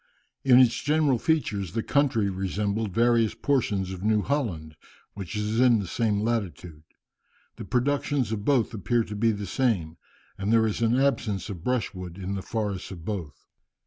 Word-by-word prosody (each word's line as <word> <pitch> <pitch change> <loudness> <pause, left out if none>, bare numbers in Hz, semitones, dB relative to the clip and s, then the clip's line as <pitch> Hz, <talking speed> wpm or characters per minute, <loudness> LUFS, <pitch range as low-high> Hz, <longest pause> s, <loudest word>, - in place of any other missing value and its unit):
In 130 -3 +6
its 125 -2 +4
general 145 -4 +2
features 105 - -1
the 115 - -1
country 135 -8 +2
resembled 100 +3 -2
various 115 +1 +2
portions 105 -9 0
of 95 -1 -7
New 105 0 +2
Holland, 90 - -2 0.4
which 100 -2 -7
is 105 +2 -1
in 125 -2 +5
the 100 - -3
same 105 +2 0
latitude. 90 -9 -3 0.8
The - - -7
productions 130 -1 0
of 105 -2 -3
both 125 -3 +2
appear 115 +2 0
to 105 - -7
be 115 +2 +2
the 105 -1 -4
same, 95 -8 -1 0.4
and 100 +2 -1
there 115 -1 +4
is 110 +1 -2
an 115 +1 +3
absence 105 -8 0
of 85 -4 -8
brushwood 95 -8 -3
in 95 0 -4
the 95 - -3
forests 105 -3 -3
of 85 -4 -9
both. 85 -10 -5
110 Hz, 170 wpm, -26 LUFS, 95-120 Hz, 0.8 s, In